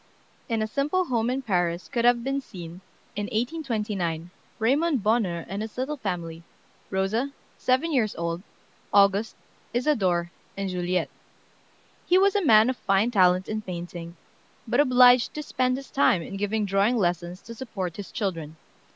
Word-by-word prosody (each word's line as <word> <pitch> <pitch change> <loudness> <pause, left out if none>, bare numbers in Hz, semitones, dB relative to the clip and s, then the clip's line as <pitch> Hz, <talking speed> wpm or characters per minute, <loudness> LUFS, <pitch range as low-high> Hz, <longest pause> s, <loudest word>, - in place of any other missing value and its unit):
] - - -35
In 220 -1 +1
a - - -2
simple 295 +10 0
home 235 -5 0
in 265 +2 -2
Paris 175 -5 0
could 235 -1 -1
have 240 -1 +4
been 275 +2 -1
seen, 175 -6 -10 0.3
in 205 0 -2
1829, 210 - -2 0.3
Raymond 270 +3 +1
Bonheur 205 -7 +1
and 195 +3 -4
his 220 +1 -7
little 275 +4 -2
family, 170 -7 -4 0.5
Rosa, 200 +8 0 0.3
seven 260 +6 +1
years 225 -6 +1
old, 170 +1 -3 0.5
August, 200 +2 +3 0.4
Isadore, 190 - +1 0.3
and 195 -1 -2
Juliette. 180 0 -1 1.0
He 360 - +5
was 390 +1 +4
a 405 - +2
man 220 -6 +6
of 255 - -8
fine 195 +4 +1
talent 185 -3 +4
in 215 0 -3
painting, 175 -2 -7 0.5
but 240 +4 +1
obliged 250 -3 +6
to 300 - -4
spend 255 -2 0
his 275 - -10
time 190 -10 +3
in 195 - -7
giving 205 +2 -1
drawing 200 +5 +2
lessons 175 -2 -1
to 230 - -9
support 195 -8 -5
his 205 - -7
children. 165 -8 -3
215 Hz, 160 wpm, -26 LUFS, 180-250 Hz, 1.0 s, man